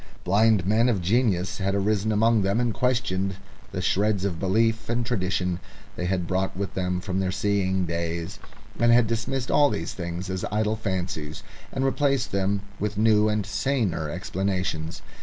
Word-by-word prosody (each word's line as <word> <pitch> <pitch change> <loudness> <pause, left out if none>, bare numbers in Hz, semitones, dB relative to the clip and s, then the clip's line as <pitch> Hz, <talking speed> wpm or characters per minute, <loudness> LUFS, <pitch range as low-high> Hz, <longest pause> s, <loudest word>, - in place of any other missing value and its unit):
Blind 105 0 +3
men 110 +5 +3
of 110 -5 +1
genius 95 -1 +1
had 95 0 0
arisen 105 +1 +1
among 110 +1 +3
them 100 +3 +1
and 120 -2 +1
questioned 100 -7 0 0.4
the 90 -2 -3
shreds 100 +1 +1
of 90 -4 -2
belief 115 +4 +1
and 120 0 0
tradition 95 -5 -1 0.4
they 90 - -3
had 90 -1 0
brought 95 +1 -1
with 100 0 -3
them 90 -1 -1
from 95 +1 -2
their 95 -1 0
seeing 95 -2 +1
days, 85 0 -3 0.4
and 120 0 +5
had 120 0 +6
dismissed 120 +3 -2
all 145 -1 +5
these 85 -8 -3
things 85 0 -5
as 95 0 -3
idle 105 +1 +1
fancies, 90 -7 -4 0.3
and 135 0 -1
replaced 135 -2 +1
them 100 +1 0 0.2
with 105 0 -2
new 110 0 +4
and 105 -2 0
saner 100 - -1
explanations. 90 -2 -2
100 Hz, 165 wpm, -25 LUFS, 90-115 Hz, 0.4 s, had